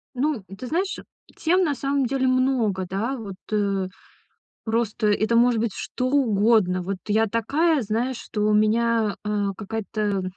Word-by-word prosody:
Ну, 290 +4 +1
м, 210 - -9
ты 250 - -7
знаешь, 370 +6 -1 0.4
тем 365 +3 +2
на 290 -4 0
самом 275 0 0
деле 260 +1 0
много, 255 -7 +1
да. 225 +8 -2
Вот, 200 -4 -7 0.2
э, 200 -3 0 0.8
просто 220 -1 0
это 215 +2 +2
может 240 -1 +4
быть 225 -3 -1
что 255 0 -3
угодно. 215 -8 +3
Вот 190 +1 -3
я 220 +1 +2
такая, 280 +8 +1
знаешь, 235 +4 -1
что 210 - -5
у 210 - +3
меня, 220 0 +2
э, 210 -1 -1
какая-то 210 -2 -2
225 Hz, 155 wpm, -24 LUFS, 210-255 Hz, 0.8 s, может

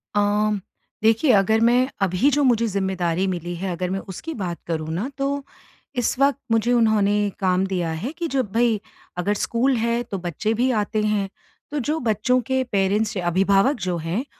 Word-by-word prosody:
अम 205 0 +2 0.4
देखिए 225 +5 +4
अगर 210 +3 +4
मैं 250 +2 +4
अभी 195 +8 +3
जो 290 +1 +2
मुझे 235 -3 +3
ज़िम्मेदारी 190 -3 -1
मिली 175 -1 -3
है, 185 +1 -3
अगर 180 +1 -2
मैं 195 +1 -2
उसकी 255 - -7
बात 180 -5 -4
करूँ 160 -2 -3
ना, 210 +11 -2
तो 280 0 -1 0.5
इस 245 -1 0
वक़्त 280 0 +3
मुझे 225 +2 +2
उन्होंने 210 -3 +3
काम 185 0 +2
दिया 180 -4 -1
है 185 - -4
कि 340 -1 -2
जब 260 -8 -1
भाई 230 -2 +2 0.4
अगर 190 +4 +1
स्कूल 245 +5 +1
है, 235 +1 0
तो 205 -4 -5
बच्चे 180 +5 -2
भी 245 +3 +1
आते 215 -1 0
हैं। 210 -2 0 0.4
तो 295 - -1
जो 300 +5 -1
बच्चों 225 +4 +2
के 260 0 +1
पेरेंट्स 205 +2 +1
या 175 -1 -2
अभिभावक 195 - +3
जो 175 - 0
हैं, 170 - -2
210 Hz, 185 wpm, -23 LUFS, 190-245 Hz, 0.5 s, देखिए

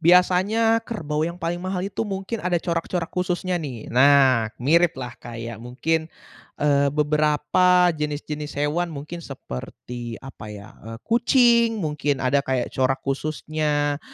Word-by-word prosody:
biasanya 185 +6 +4
kerbau 155 -11 -3
yang 170 +1 -5
paling 170 0 -2
mahal 185 0 -3
itu 200 0 -4
mungkin 195 +3 -4
ada 180 0 +1
corak-corak 170 0 -2
khususnya 180 0 -1
nih. 125 -7 -7
Nah 130 -3 +5
miriplah 145 -4 +2
kayak 115 -1 -7
mungkin, 160 +7 -1 0.5
eee, 140 -1 +3
beberapa 150 +5 +3
jenis-jenis 150 -1 -4
hewan. 155 +4 0
Mungkin 155 +3 -7
seperti 120 - -7
apa 135 -5 -10
ya, 100 -1 -9 0.2
eee, 115 0 -7
kucing, 235 -1 +4
mungkin 150 -2 -1
ada 140 +2 +3
kayak 130 -3 -2
corak 130 0 0
khususnya. 145 +1 -1
150 Hz, 125 wpm, -23 LUFS, 135-180 Hz, 0.5 s, Nah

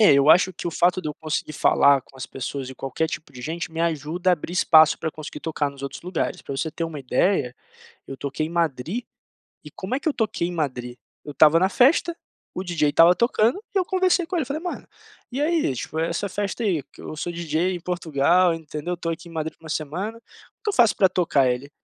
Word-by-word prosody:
É, 210 - +7
eu 140 +2 +5
acho 185 +1 +5
que 175 - -7
o - - -1
fato 175 +3 +2
de 155 - -3
eu 150 - -5
conseguir 155 -1 -3
falar 140 -1 +4
com 135 - -20
as 130 - -5
pessoas 135 0 -5
e 130 - -9
qualquer 135 +5 -2
tipo 155 - -7
de 125 - -10
gente 165 +4 -4
me 165 - -4
ajuda 170 +3 0
a - - +6
abrir 170 0 -3
espaço 160 -3 +6
pra 160 - -2
eu - - -7
conseguir 150 -1 -8
tocar 150 -3 -2
nos 140 -1 -13
outros 140 -1 -6
lugares. 180 0 -2
Pra 135 - -5
você 150 +4 -2
ter 165 - -3
uma 160 -3 -6
ideia, 130 0 +1 0.5
eu 135 - -7
toquei 140 +2 -3
em - - -9
Madrid 170 - -1 0.6
e - - -10
como 195 +7 -5
é 275 - -1
que - - -1
eu - - +1
toquei 215 -6 -1
em - - -5
Madrid? 125 -7 -3 0.3
Eu 150 - -7
estava 155 +3 +6
na 190 - +4
festa, 320 - +3 0.4
o 185 - -4
DJ 155 -5 +1
estava 170 +4 +6
tocando 235 - +2
e - - +3
eu 370 - +2
conversei 370 -1 +2
com 370 - -5
ele, 310 - +1
falei: 285 +5 -4
"Mano, 355 - -5 0.4
e 260 +3 -3
aí, 310 - +1
tipo, 145 +5 -5
essa 170 +4 -1
festa 205 +4 -3
aí, 170 -8 +1 0.2
eu - - -7
sou 175 +3 -3
DJ 170 +2 -1
em 175 - -5
Portugal, 170 0 +2
entendeu, 160 +2 -5
tô 165 -1 -3
aqui 165 +1 -6
em 165 - -13
Madrid 160 0 -4
por 165 - -24
1 - - -9
semana, 180 +10 -3
o 230 - -23
que - - -1
eu - - -4
faço 235 - +4
pra 190 - +5
tocar?". 165 -8 +2
Ele: 125 +3 -2
165 Hz, 240 wpm, -24 LUFS, 150-190 Hz, 0.6 s, É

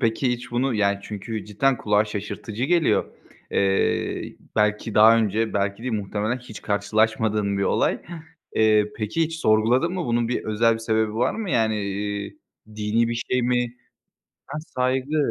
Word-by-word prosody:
Peki 115 +2 +1
hiç 120 +1 -6
bunu 125 +1 0
yani 100 -1 +2
çünkü 105 +1 -5
cidden 125 +6 +1
kulağa 105 0 +2
şaşırtıcı 105 +3 -5
geliyor. 170 +1 +3 0.5
Eee, 95 -1 0 0.2
belki 105 +1 +1
daha 110 +2 +7
önce, 110 0 0
belki 100 +2 -1
değil 125 -2 -3
muhtemelen 105 +4 -2
hiç 110 -4 -11
karşılaşmadığın 105 0 +1
bir - - 0
olay. - - +1 0.5
Eee, 110 -1 +4
peki, 110 +10 -1
hiç 160 0 -2
sorguladın 115 +10 +3
mı? 180 -3 -2
Bunun 120 -1 +1
bir 125 - -2
özel 115 +2 +2
bir - - -5
sebebi 110 -1 0
var 120 +3 +1
mı? 220 -5 -4
Yani, 110 -2 +1
iii, 100 +1 -4 0.4
dini 110 +2 +1
bir 120 +1 -2
şey 125 -1 +2
mi? 125 0 0 0.7
Ha, 145 +3 -5
saygı. 130 +4 -1
110 Hz, 155 wpm, -24 LUFS, 105-125 Hz, 0.7 s, daha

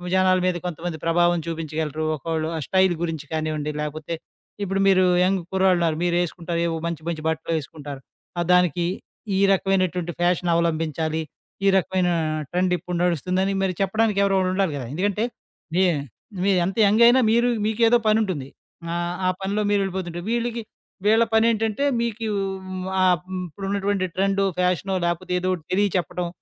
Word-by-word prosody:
జనాల 185 0 +4
మీద 185 -1 +1
కొంతమంది 175 -1 -4
ప్రభావం 175 +1 +3
చూపించగలరు. 155 -2 -3
ఒక్కోళ్ళు 160 +2 -2
ఆ - - -2
స్టైల్ 190 -1 +3
గురించి 160 -3 -3
కానివ్వండి 155 -1 -2
లేపోతే 155 +2 -4 0.5
ఇప్పుడు 195 0 -1
మీరు 185 -1 +5 0.2
యంగ్ 190 0 +1
కుర్రాళ్ళున్నారు. 180 -4 +2
మీరేసుకుంటారు 175 -1 -1
ఏవో 165 - -2
మంచి, 170 -2 -3
మంచి 160 -2 -4
బట్టలు 160 +1 -2
వేసుకుంటారు. 145 -2 -7 0.4
ఆహ్, 170 - -1
దానికి 180 -1 +3 0.5
ఈ - - +2
రకమైనటువంటి 185 -3 +1
ఫ్యాషన్ 175 0 +1
అవలంబించాలి. 160 -1 0 0.4
ఈ - - +5
రకమైన 185 -1 +1 0.4
ట్రెండ్ 180 +1 +1
ఇప్పుడు 180 0 -5
నడుస్తుందని 185 +3 0
మరి 185 -1 0
చెప్పడానికి 210 +1 +1
ఎవరో 195 -1 +2
ఒకళ్ళు 185 -1 +1
ఉండాలి 190 -3 +1
కదా! 130 - -5
ఎందుకంటే, 205 +5 0 0.5
మీ 185 - +4 0.6
మీరెంత 190 0 +1
యంగ్ 220 +4 +4
అయినా 255 +2 +6
మీరు 235 +1 +3 0.2
మీకేదో 225 +2 +4
పనుంటుంది. 195 -11 +1 0.4
ఆహ్, 175 +1 -2
ఆ - - +4
పనిలో 200 +2 -1
మీరు 205 -1 +3
వెళ్ళిపోతుంటే. 180 -3 -4
వీళ్ళకి 235 0 -1 0.5
వీళ్ళ 225 +2 +5
పనేంటంటే 225 +2 +2 0.2
మీకు 230 -1 -2 0.8
ఆహ్, 180 -2 +4
హ్మ్. 185 -1 -3
ఇప్పుడు 195 +5 -8
ఉన్నటువంటి 200 -1 0
ట్రెండు, 195 +1 +1 0.2
ఫ్యాషనో 180 +1 +1
లేకపోతే 175 +1 -2
ఏదోకటి 185 -3 -2
తెలియ 205 +2 +3
చెప్పడం 180 0 -2
180 Hz, 150 wpm, -23 LUFS, 165-195 Hz, 0.8 s, అయినా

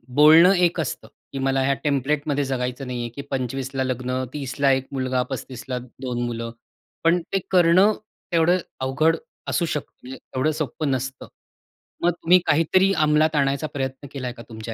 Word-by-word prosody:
बोलणं 160 +5 +8
एक 175 -1 +2
असतं, 115 -6 -3 0.3
की 135 - -3
मला 135 0 +1
ह्या 140 +1 +2
टेम्प्लेटमध्ये 145 +1 0
जगायचं 125 0 -3
नाही 125 -1 -4
आहे, 120 - -4
की 140 +5 -8
25 130 0 -2
ला 130 - +1
लग्न, 130 0 -2
30 135 -4 -5
ला 140 -1 +4
1 130 0 0
मुलगा, 130 -1 0
35 130 -1 -6
ला 125 - -1 0.2
2 125 -2 -3
मुलं, 115 -1 -4 0.5
पण 170 +1 +3
ते 195 - +3
करणं 185 +3 +5 0.4
तेवढं 170 +2 +4 0.2
अवघड 155 +5 +2 0.3
असू 170 - +1
शकतं, 150 -3 -4
म्हणजे 130 +1 -8
तेवढं 130 +4 -2
सोपं 150 -1 -2
नसतं. 130 +1 -3 0.8
मग 175 - +4
तुम्ही 175 +1 +4
काहीतरी 185 +5 +3
अंमलात 155 0 +3
आणायचा 140 +2 +1
प्रयत्न 135 0 -4
केलाय 130 -3 -4
का 115 -1 -11
तुमच्या 110 0 -7
135 Hz, 170 wpm, -23 LUFS, 130-155 Hz, 0.8 s, बोलणं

